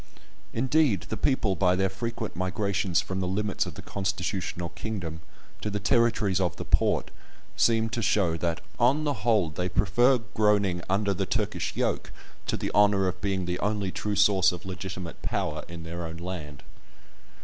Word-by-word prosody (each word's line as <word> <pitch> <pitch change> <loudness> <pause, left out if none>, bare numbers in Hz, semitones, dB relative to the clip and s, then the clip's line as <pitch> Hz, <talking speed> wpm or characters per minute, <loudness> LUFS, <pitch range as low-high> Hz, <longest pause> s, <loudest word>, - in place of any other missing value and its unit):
Indeed 130 -2 +2
the - - -1
people, 110 -7 +1
by 90 -1 +3
their 95 +1 +2
frequent 110 +2 -4
migrations 95 0 0
from 95 0 -4
the 90 - -1
limits 100 +2 0
of - - -7
the - - -9
constitutional 95 -2 -2
kingdom 85 -5 -5 0.4
to 105 - -2
the 105 0 -2
territories 105 -3 +2
of 90 -5 0
the - - -6
Porte, - - +2 0.4
seem 115 -1 +3
to 115 - -2
show 95 -4 +2
that, 85 0 -1 0.2
on 130 +6 +4
the 145 -1 +1
whole, 105 -9 +3
they 90 +4 -2
prefer 120 +9 +4 0.2
"groaning 100 -4 +2
under 100 +1 +2
the 90 - -2
Turkish - - -1
yoke" - - -1 0.4
to - - 0
the - - -3
honour 100 -2 +4
of 90 0 -3
"being 95 -2 -1
the 90 +1 -2
only 105 -2 -1
true 105 +2 -2
source 95 -2 +5
of 90 0 -8
legitimate 95 -2 -6
power" - - -2
in 85 0 -8
their 85 +1 -5
own 80 +1 -7
land. 85 -5 -6
95 Hz, 170 wpm, -27 LUFS, 90-105 Hz, 0.4 s, source